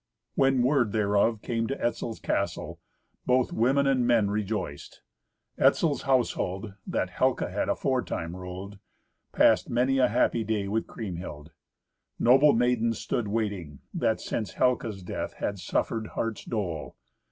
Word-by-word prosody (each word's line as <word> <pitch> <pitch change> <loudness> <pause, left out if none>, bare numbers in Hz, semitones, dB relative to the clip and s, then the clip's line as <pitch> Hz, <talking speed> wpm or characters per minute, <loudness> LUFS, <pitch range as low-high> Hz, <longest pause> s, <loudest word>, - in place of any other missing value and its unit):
When 135 -2 +3
word 125 -5 +2
thereof 105 +1 +2
came 115 -1 -1
to 135 - -3
Etzel's 120 -1 -2
castle, - - -2 0.5
both 125 0 +2
women 135 +5 +3
and 130 -3 +2
men 115 -4 +3
rejoiced. 105 -8 -4 0.6
Etzel's 155 -4 +3
household, 110 -6 0
that - - -1
Helca - - 0
had - - -1
aforetime 85 +1 -1
ruled, 95 +2 -8 0.5
passed - - +4
many 130 +2 +2
a 125 - +5
happy 115 -1 +1
day 105 -2 -1
with 110 +3 -1
Kriemhild. 85 -7 -7 0.7
Noble 135 +5 +6
maidens 115 -1 +2
stood 115 -1 -2
waiting, 100 -9 -2 0.2
that - - +1
since 110 -3 -4
Helca's 115 -6 0
death - - -4
had 100 -1 -3
suffered 110 +4 -1
heart's 115 -1 -4
dole. 90 - -3
110 Hz, 130 wpm, -27 LUFS, 100-125 Hz, 0.7 s, Noble